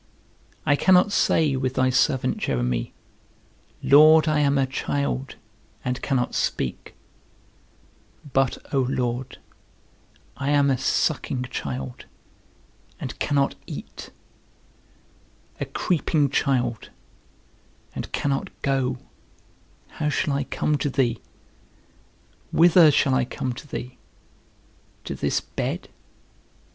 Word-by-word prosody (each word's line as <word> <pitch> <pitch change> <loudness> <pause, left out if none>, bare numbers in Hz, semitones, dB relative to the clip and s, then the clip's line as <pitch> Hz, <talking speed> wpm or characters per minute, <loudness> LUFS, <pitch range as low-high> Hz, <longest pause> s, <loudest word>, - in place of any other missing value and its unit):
I 145 - +4
cannot 185 +5 +4
say, 155 -7 +2
with 130 0 -2
thy 130 0 +2
servant 130 0 +1
Jeremy, - - -1 0.9
Lord, 155 +2 +7
I 155 -1 +2
am 140 -1 +2
a 135 - +3
child, 70 - -3 0.5
and 125 0 -2
cannot 130 -3 0
speak; 65 - -2 1.4
but, 135 -2 +2 0.2
O 135 - +3
Lord, 125 -1 -2 1.0
I 140 0 -2
am 145 -1 +3
a 130 - +1
sucking 125 - 0
child, 65 - -5 0.9
and - - -6
cannot 140 -1 +1
eat; - - -8 1.5
a - - -2
creeping 155 -5 0
child, 125 -6 0 1.0
and - - -6
cannot 140 -1 -1
go; 135 -2 0 1.0
how 150 -1 +1
shall 150 -1 0
I 140 0 -1
come 150 +1 -1
to 145 - 0
thee? 125 -4 0 1.3
Whither 170 -1 +6
shall 140 -2 +2
I 130 0 +2
come 125 0 -4
to 130 - -11
thee? 125 -2 -7 1.0
To - - -5
this - - -1
bed? - - -4
135 Hz, 105 wpm, -24 LUFS, 125-145 Hz, 1.5 s, Lord